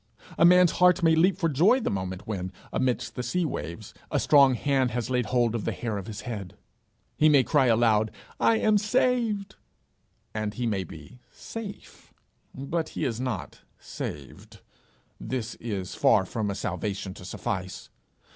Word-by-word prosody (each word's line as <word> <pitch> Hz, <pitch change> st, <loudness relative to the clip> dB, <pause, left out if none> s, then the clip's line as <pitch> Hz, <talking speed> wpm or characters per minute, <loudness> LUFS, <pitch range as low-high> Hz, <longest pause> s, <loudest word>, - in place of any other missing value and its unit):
A -, -, +4 dB
man's 180 Hz, -1 st, +6 dB
heart 180 Hz, 0 st, +4 dB
may 165 Hz, -1 st, +5 dB
leap 180 Hz, +3 st, +3 dB
for 175 Hz, -4 st, +1 dB
joy 175 Hz, -, +4 dB
the -, -, -2 dB
moment 95 Hz, -1 st, -4 dB
when, 95 Hz, -4 st, -4 dB, 0.2 s
amidst 125 Hz, -2 st, -1 dB
the -, -, -4 dB
sea 165 Hz, +9 st, -1 dB
waves, 85 Hz, -, -6 dB, 0.2 s
a -, -, 0 dB
strong 140 Hz, -3 st, +5 dB
hand 135 Hz, 0 st, +1 dB
has 120 Hz, +1 st, -3 dB
laid 125 Hz, -2 st, 0 dB
hold 120 Hz, -3 st, +1 dB
of 115 Hz, -3 st, -2 dB
the -, -, -1 dB
hair 110 Hz, -4 st, -3 dB
of 100 Hz, -, -9 dB
his 105 Hz, -2 st, -6 dB
head; 100 Hz, -7 st, -7 dB, 0.6 s
he 155 Hz, -, +4 dB
may 140 Hz, -3 st, +5 dB
cry 140 Hz, -1 st, +3 dB
aloud, 110 Hz, -2 st, +3 dB, 0.3 s
'I 225 Hz, -, +4 dB
am 215 Hz, -1 st, +3 dB
saved;' 215 Hz, -3 st, 0 dB, 0.8 s
and 110 Hz, -1 st, -3 dB
he 125 Hz, -, -2 dB
may 100 Hz, -4 st, 0 dB
be 125 Hz, +8 st, -12 dB
safe, 220 Hz, -3 st, -9 dB, 0.4 s
but 155 Hz, +5 st, -3 dB
he -, -, 0 dB
is 120 Hz, -1 st, -2 dB
not 125 Hz, -8 st, -4 dB, 0.2 s
saved; 70 Hz, -2 st, -8 dB, 0.6 s
this 125 Hz, -2 st, -4 dB
is 100 Hz, -6 st, -4 dB
far 95 Hz, -, +3 dB
from 105 Hz, +1 st, -3 dB
a 100 Hz, -, -3 dB
salvation 95 Hz, +1 st, -4 dB
to 90 Hz, -, -12 dB
suffice. 95 Hz, 0 st, -5 dB
125 Hz, 165 wpm, -27 LUFS, 105-165 Hz, 0.8 s, man's